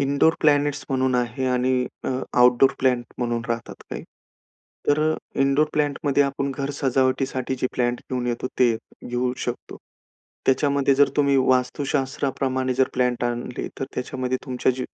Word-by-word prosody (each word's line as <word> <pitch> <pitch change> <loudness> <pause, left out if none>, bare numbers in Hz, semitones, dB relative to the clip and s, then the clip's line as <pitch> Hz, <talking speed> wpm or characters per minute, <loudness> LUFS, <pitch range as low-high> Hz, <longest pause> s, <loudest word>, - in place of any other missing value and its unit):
Indoor 140 +4 +3
planets 145 -2 +2
म्हणून 130 -1 +1
आहे 125 +1 -1
आणि 125 0 +1 0.2
अ, - - -1 0.3
आउटडोर 125 +2 +6
प्लॅनेट 125 -2 +1
म्हणून 120 -1 -1
राहतात 115 -1 -3 0.2
काही. - - -5 0.9
तर 145 +1 +4
अ, - - -1 0.3
इंडोर 140 +2 +3
प्लांटमध्ये 145 -1 +1
आपण 140 0 -1
घर 140 0 -2
सजावटीसाठी 130 -1 0
जे - - +2
प्लांट 120 -1 0
घेऊन 125 -1 -1
येतो, 120 +1 -2
ते 120 -3 +4 0.3
घेऊ 125 +1 0
शकतो. 120 0 -5 0.7
त्याच्यामध्ये 140 0 +3
जर 140 +1 +5
तुम्ही 140 -1 +3
वास्तुशास्त्राप्रमाणे 130 0 0
जर 130 +1 +2
प्लांट 125 -1 +1
आणले, 120 +1 -3
तर - - 0
त्याच्यामध्ये 130 0 -2
तुमच्या 130 -1 +1
जी 125 0 -4
130 Hz, 145 wpm, -23 LUFS, 125-140 Hz, 0.9 s, आउटडोर